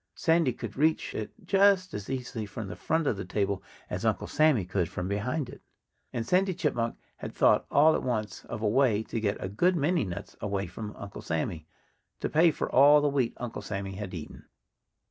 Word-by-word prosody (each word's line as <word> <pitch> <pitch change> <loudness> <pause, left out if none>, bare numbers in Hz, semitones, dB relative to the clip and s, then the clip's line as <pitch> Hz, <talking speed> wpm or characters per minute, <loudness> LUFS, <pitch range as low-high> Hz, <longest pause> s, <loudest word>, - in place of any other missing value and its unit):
Sandy 165 -5 +3
could 115 -2 -7
reach 155 +3 +1
it 110 - -4
just 195 -3 +4
as 100 +2 -6
easily 125 -5 -4
from 100 +1 -6
the - - -6
front 160 0 0
of 110 - +1
the 100 - -4
table 100 +1 -1 0.3
as 90 +3 -4
Uncle 110 -2 +1
Sammy 155 - +3
could 90 -2 -1
from 90 - -4
behind 120 +9 -1
it. - - -11 0.5
And 115 -2 -3
Sandy 185 +3 +2
Chipmunk 115 -5 -1 0.2
had - - -7
thought - - +4
all 155 +3 +5
at - - 0
once 110 -6 -3
of 110 -2 -6
a - - +3
way 110 -2 +3
to 115 - -4
get 100 -2 0
a - - -3
good 175 - +2
many 165 0 +2
nuts 90 -4 -6
away 100 -1 -1
from 105 +4 -7
Uncle 100 -1 -8
Sammy, 80 0 -3 0.5
to - - -2
pay 165 +2 +5
for 155 - -2
all 145 +3 +7
the 145 0 +2
wheat 135 -4 0
Uncle 120 -3 -5
Sammy 100 -1 -4
had 95 -1 -6
eaten. 80 - -9
115 Hz, 205 wpm, -28 LUFS, 100-150 Hz, 0.5 s, all